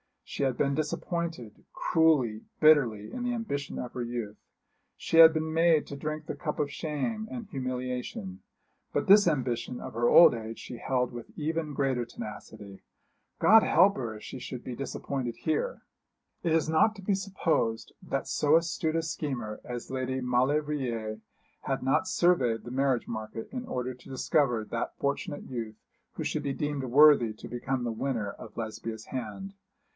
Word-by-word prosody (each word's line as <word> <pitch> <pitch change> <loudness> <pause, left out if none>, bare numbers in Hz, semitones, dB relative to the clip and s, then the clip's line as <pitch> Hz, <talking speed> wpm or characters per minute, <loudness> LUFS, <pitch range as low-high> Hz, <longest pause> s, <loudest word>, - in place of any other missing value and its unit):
She - - -6
had 130 -3 0
been 140 -1 +1
disappointed, 155 - -3
cruelly, 140 -10 +2 0.2
bitterly, 125 -10 +4
in 250 - -5
the 245 0 0
ambition 205 - -3
of 125 - -5
her 125 - -4
youth. 120 -3 -4 0.6
She 165 - -1
had 165 0 +11
been 160 0 -2
made 165 -2 +4
to 140 - -6
drink 155 +2 -4
the - - -4
cup 150 -3 -4
of 145 -1 -1
shame 175 - -3
and 240 -3 -6
humiliation. 125 -7 -4 0.5
But - - +2
to - - -8
this 200 0 +7
ambition 125 -5 -1
of - - -7
her 120 +2 +1
old 170 - +8
age 115 -1 -6
she 120 - -8
held 125 0 0
with 120 -1 -8
even 155 0 -2
greater 135 -3 0
tenacity. 105 -3 -9 0.6
God 220 +1 +7
help 195 +2 +4
her 115 -4 -4
if 105 - -11
she - - -7
should 125 0 -7
be 125 - -5
disappointed 130 -1 -4
here! 160 - -2 0.6
It 165 -3 +1
is 160 -1 +2
not 160 +8 +3
to 195 - -11
be 200 - +1
supposed 180 - -1
that - - -3
so 150 +1 +2
astute 165 -1 +1
a 165 - +1
schemer 130 -9 -4
as 120 0 -6
Lady 130 0 -2
Maulevrier 125 -3 0 0.4
had 135 -1 -2
not 135 +7 +2
surveyed 170 -12 +2
the 120 - -8
marriage 135 -1 +1
market 110 0 -6
in 250 -1 -5
order 125 0 -3
to 125 +1 -16
discover 130 -3 +1
that 115 +2 -4
fortunate 145 +2 -2
youth 115 -4 -5 0.4
who - - -4
should - - -1
be 140 -1 -1
deemed 145 -2 -2
worthy 130 -3 +6
to 110 - -10
become 125 +2 -2
the 120 - -1
winner 115 -3 -2
of - - -12
Lesbia's 110 -1 -5
hand. 130 - -5
135 Hz, 170 wpm, -29 LUFS, 120-160 Hz, 0.6 s, had